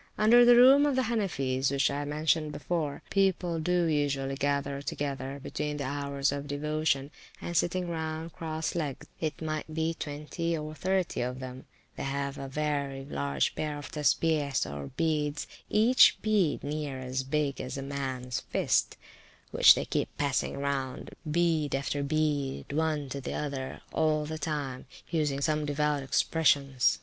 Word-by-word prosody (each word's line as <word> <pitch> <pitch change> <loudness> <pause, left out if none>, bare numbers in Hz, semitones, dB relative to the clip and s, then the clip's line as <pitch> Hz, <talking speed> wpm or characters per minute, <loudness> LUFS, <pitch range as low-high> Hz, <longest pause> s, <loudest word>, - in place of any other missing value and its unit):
Under 235 +3 +7
the 240 0 +8
room 270 +4 +7
of 285 - +1
the 260 - +2
Hanifees 140 - 0
(which 140 0 +2
I 145 +1 -2
mentioned 155 +1 +1
before), 150 0 -3
people 185 -4 +1
do 180 +2 +1
usually 145 -3 0
gather 140 0 -1
together 140 -1 -4
(between 150 0 -3
the 145 - -3
hours 140 0 -1
of 140 0 -4
devotion), 145 -1 -1 0.3
and 175 - -5
sitting 180 +2 +1
round 160 0 -4
cross 160 -1 -3
legged, 150 -6 -3
it 155 -3 -2
may 155 -1 -1
be, 160 +1 0
twenty 160 +3 -3
or 155 0 -5
thirty 185 0 0
of 125 +1 -3
them, 130 0 -8 0.3
they - - -4
have 140 0 -3
a 135 - -5
very 140 -1 -2
large 70 - -1
pair 150 -1 -3
of 145 - -8
Tessbeehs, 150 -2 +1
or 70 -1 -6
beads, 150 -1 -1 0.2
each 230 +4 +6
bead 205 -8 +2
near 145 -2 -3
as 130 0 -2
big 140 +1 -1
as 130 - -5
a 135 - -4
mans 130 -3 -3
fist, - - +1 0.5
which - - +8
they - - -2
keep - - -1
passing 140 -2 0
round, 140 -2 -3 0.2
bead 160 -3 +1
after 140 +1 -1
bead, 145 -2 -1
one 155 -2 0
to 140 +1 -5
the - - -4
other, 140 -3 -4
all 155 -1 +2
the 155 +1 -5
time, 145 -5 -3 0.2
using 150 -4 0
some 150 +1 +1
devout 150 0 0
expressions. 140 -2 +2
145 Hz, 160 wpm, -29 LUFS, 140-160 Hz, 0.5 s, the